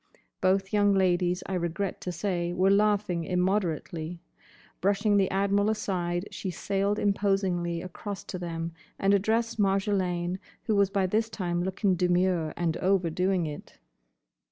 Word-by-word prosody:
Both 195 Hz, +2 st, +2 dB
young 205 Hz, -1 st, +4 dB
ladies, 180 Hz, -1 st, +2 dB
I 195 Hz, -, -4 dB
regret 180 Hz, +2 st, -2 dB
to 180 Hz, -, -3 dB
say, 175 Hz, -1 st, -2 dB
were 190 Hz, +2 st, +3 dB
laughing 205 Hz, -4 st, +2 dB
immoderately. 175 Hz, -2 st, -1 dB, 0.6 s
Brushing 205 Hz, +3 st, +2 dB
the 195 Hz, -2 st, +3 dB
Admiral 200 Hz, +2 st, +2 dB
aside, 185 Hz, -4 st, -1 dB
she 190 Hz, -, -4 dB
sailed 200 Hz, +3 st, -1 dB
imposingly 190 Hz, -4 st, 0 dB
across 195 Hz, +2 st, -6 dB
to 185 Hz, -, -6 dB
them 165 Hz, -1 st, -4 dB, 0.3 s
and 195 Hz, +1 st, +3 dB
addressed 225 Hz, +3 st, +1 dB
Marjolaine, 190 Hz, -3 st, +1 dB, 0.2 s
who 220 Hz, -, 0 dB
was 200 Hz, -1 st, +4 dB
by 195 Hz, -1 st, +1 dB
this 220 Hz, +4 st, 0 dB
time 175 Hz, -5 st, -2 dB
looking 190 Hz, +1 st, +1 dB
demure, 180 Hz, -2 st, +1 dB
and 170 Hz, -1 st, 0 dB
overdoing 185 Hz, -1 st, +1 dB
it. 150 Hz, -1 st, -8 dB
190 Hz, 135 wpm, -28 LUFS, 175-200 Hz, 0.6 s, young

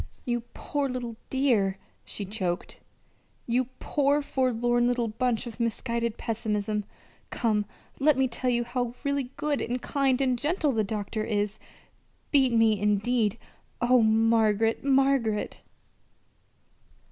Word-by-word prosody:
"You 240 Hz, -1 st, 0 dB
poor 285 Hz, -2 st, -2 dB
little 245 Hz, -2 st, -4 dB
dear!" 230 Hz, -8 st, +2 dB, 0.3 s
she 205 Hz, -, -7 dB
choked. 185 Hz, -3 st, -3 dB, 0.7 s
"You 245 Hz, +2 st, +1 dB
poor 285 Hz, 0 st, +1 dB
forlorn 240 Hz, -3 st, +1 dB
little 245 Hz, -2 st, 0 dB
bunch 235 Hz, +1 st, -1 dB
of 235 Hz, -1 st, -8 dB
misguided 235 Hz, 0 st, -1 dB
pessimism! 210 Hz, -2 st, -2 dB, 0.4 s
Come, 215 Hz, -3 st, 0 dB, 0.3 s
let 290 Hz, 0 st, +4 dB
me 265 Hz, 0 st, +3 dB
tell 250 Hz, +1 st, -1 dB
you 240 Hz, -1 st, +2 dB
how 245 Hz, 0 st, -3 dB
really 280 Hz, -3 st, -1 dB
good 295 Hz, -1 st, 0 dB
and 245 Hz, +2 st, -2 dB
kind 270 Hz, -1 st, +1 dB
and 255 Hz, -3 st, +1 dB
gentle 300 Hz, +1 st, +1 dB
the 225 Hz, -4 st, +1 dB
doctor 210 Hz, +1 st, -3 dB
is. 210 Hz, -1 st, -1 dB, 0.7 s
Beat 270 Hz, -4 st, +4 dB
me, 225 Hz, -2 st, +4 dB
indeed! 210 Hz, +1 st, +1 dB, 0.4 s
Oh, 245 Hz, 0 st, +4 dB
Margaret, 225 Hz, 0 st, +3 dB
Margaret!" 270 Hz, -6 st, +1 dB
235 Hz, 125 wpm, -27 LUFS, 220-260 Hz, 0.7 s, let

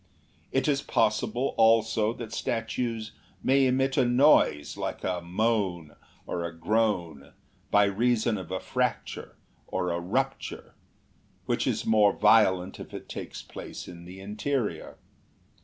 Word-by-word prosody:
It 135 Hz, +1 st, +1 dB
is 140 Hz, -2 st, +2 dB
possible 120 Hz, +2 st, 0 dB
also 110 Hz, -1 st, +4 dB
that 115 Hz, -2 st, -8 dB
statues 115 Hz, -1 st, -2 dB, 0.3 s
may 135 Hz, 0 st, +4 dB
emit 135 Hz, +1 st, +1 dB
a 135 Hz, -, +5 dB
noise 120 Hz, -, +4 dB
like -, -, -4 dB
a 90 Hz, -1 st, -1 dB
moan 90 Hz, -4 st, -1 dB, 0.3 s
or 85 Hz, -, -3 dB
a 85 Hz, -, -3 dB
groan, 85 Hz, -6 st, -1 dB, 0.4 s
by 105 Hz, -, +5 dB
reason 110 Hz, +1 st, +1 dB
of 95 Hz, -, -9 dB
a 95 Hz, 0 st, -2 dB
fracture 125 Hz, -3 st, -3 dB, 0.3 s
or 90 Hz, -1 st, -1 dB
a 85 Hz, -, -1 dB
rupture, 85 Hz, +1 st, -3 dB, 0.7 s
which -, -, 0 dB
is -, -, -1 dB
more 105 Hz, -2 st, +4 dB
violent 105 Hz, -4 st, +3 dB
if -, -, -9 dB
it -, -, -8 dB
takes -, -, -7 dB
place -, -, -9 dB
in 85 Hz, -1 st, -10 dB
the 90 Hz, +2 st, -10 dB
interior. 105 Hz, -, -3 dB
110 Hz, 135 wpm, -27 LUFS, 90-120 Hz, 0.7 s, a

